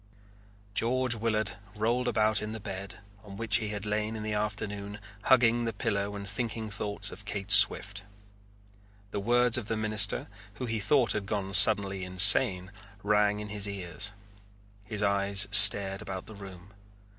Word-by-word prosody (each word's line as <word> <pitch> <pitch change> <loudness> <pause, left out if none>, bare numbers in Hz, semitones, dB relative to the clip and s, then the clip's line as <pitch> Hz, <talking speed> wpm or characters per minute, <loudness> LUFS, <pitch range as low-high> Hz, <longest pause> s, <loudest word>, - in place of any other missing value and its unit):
George 125 +4 0
Willard 110 -1 -2 0.2
rolled 120 +4 -1
about 110 -2 0
in 105 0 -6
the 110 - -7
bed 100 -1 -8 0.3
on 100 -2 -12
which 115 +1 0
he 110 -2 -4
had 105 -1 -6
lain 105 +1 -3
in 110 - -6
the 110 0 -4
afternoon 105 -1 -5 0.3
hugging 120 -2 +3
the 115 - -3
pillow 100 0 -3
and 100 0 -8
thinking 110 +1 -5
thoughts 105 0 -4
of 100 - -12
Kate 100 0 -5
Swift. 100 +1 +5 1.1
The - - -4
words 120 +3 +1
of 110 - -9
the 115 - -3
minister, 110 -2 +2 0.3
who 125 - -6
he 115 -2 -3
thought 120 0 +1
had 100 -2 -4
gone 100 -2 -4
suddenly 100 -1 +5
insane, 90 0 +4 0.3
rang 105 0 +1
in 105 - -8
his 105 -1 +1
ears. 100 +1 -4 0.7
His 105 0 -4
eyes 100 0 +1
stared 100 -2 +5
about 95 -1 -7
the 110 - -12
room. 95 -1 -13
105 Hz, 160 wpm, -28 LUFS, 100-110 Hz, 1.1 s, Swift